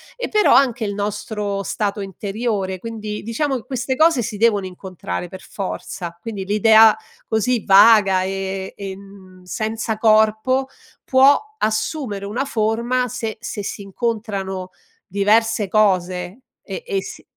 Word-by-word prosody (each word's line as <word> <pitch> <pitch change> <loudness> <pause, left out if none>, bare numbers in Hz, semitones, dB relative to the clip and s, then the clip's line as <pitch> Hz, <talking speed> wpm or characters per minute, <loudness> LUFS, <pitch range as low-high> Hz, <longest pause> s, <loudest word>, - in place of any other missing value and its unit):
e - - -4
però 425 -1 +4
anche 245 -4 +3
il 205 - -2
nostro 205 0 -3
stato 205 0 -2
interiore. 195 0 -3
Quindi, 215 -1 -6
diciamo, 265 +6 -1
che 245 - -5
queste 260 0 -2
cose 315 -3 +4
si 220 -2 -4
devono 205 -3 +2
incontrare, 180 - -6
per 185 +2 -10
forza. 175 -3 -6
Quindi, 210 -4 -5
l'idea 220 +2 +6 0.3
così 225 +1 0
vaga 195 -1 +6
e 190 0 -4
e 195 -1 -6
en 190 -1 -13
senza 220 +3 -3
corpo, 220 +4 +3 0.4
può 270 +2 +5 0.2
assumere 220 - -2
una 235 +7 -2
forma 235 +1 0
se 225 -2 -5
se 230 -2 -5
si 200 - -5
incontrano 195 -3 -3 0.4
diverse 215 +1 +2
cose, 185 0 0 0.2
e 485 - -7
e 400 -5 -1
si - - -10
215 Hz, 135 wpm, -20 LUFS, 195-230 Hz, 0.4 s, l'idea